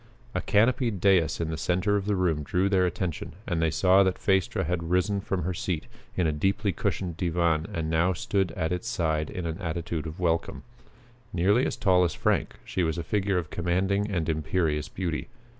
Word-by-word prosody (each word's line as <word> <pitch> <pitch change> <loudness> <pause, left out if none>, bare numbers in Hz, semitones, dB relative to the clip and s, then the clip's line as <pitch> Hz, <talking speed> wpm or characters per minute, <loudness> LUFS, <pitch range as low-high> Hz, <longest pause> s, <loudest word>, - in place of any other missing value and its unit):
A - - -1
canopied 115 0 +2
dais 95 -4 +3
in 80 -1 -2
the 80 - -4
center 95 +6 +1
of 100 -1 -1
the 105 - +2
room 85 -5 +1
drew 95 +5 +1
their 95 -2 +3
attention 90 -2 -4
and 85 -3 -1
they 80 - +3
saw 95 +4 +4
that 95 -1 +2
Phaestra 95 -3 +1
had 85 0 -2
risen 90 +3 +1
from 95 -2 -2
her 90 +3 -1
seat 85 -2 -3 0.3
in 90 - +1
a 80 - +2
deeply 95 +7 0
cushioned 85 0 -2
divan 85 -2 +1
and 80 -1 -2
now 80 +3 +2
stood 95 +1 0
at 80 -4 -2
its 90 +6 -2
side 80 -9 0
in 90 -4 -5
an 80 -1 -3
attitude 85 -1 -3
of 80 +3 -8
welcome. 85 -2 -1 0.7
Nearly 100 +8 +3
as - - -3
tall 90 -3 +4
as 85 - 0
Frank, - - 0
she 95 - -2
was 80 -1 0
a 85 - -2
figure 100 -1 0
of 85 -4 -3
commanding 95 +4 0
and 85 -6 -1
imperious 80 -1 0
beauty. 85 -4 -3
90 Hz, 200 wpm, -27 LUFS, 80-95 Hz, 0.7 s, saw